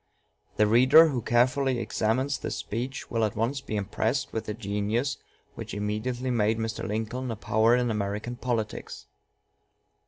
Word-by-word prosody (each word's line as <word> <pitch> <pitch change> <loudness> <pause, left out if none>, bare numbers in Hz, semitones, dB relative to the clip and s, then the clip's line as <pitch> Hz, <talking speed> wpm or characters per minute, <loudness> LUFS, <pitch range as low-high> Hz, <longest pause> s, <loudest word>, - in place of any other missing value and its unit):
The 105 - +5
reader 130 +9 +7
who 130 -5 -2
carefully 125 +3 +2
examines 115 +3 0
this - - -4
speech 125 +5 -5
will 115 -1 +1
at 105 - 0
once 120 +5 -1
be 110 - -5
impressed 110 +5 -1
with 110 -1 -3
the 105 - -4
genius 110 +5 -1 0.4
which - - -7
immediately 115 +5 -2
made 110 -2 +2
Mr. 115 0 -3
Lincoln 115 +4 -3
a 115 - -2
power 110 +2 +3
in 125 -1 +1
American 105 +3 -3
politics. 120 -3 -4
115 Hz, 150 wpm, -27 LUFS, 105-125 Hz, 0.4 s, reader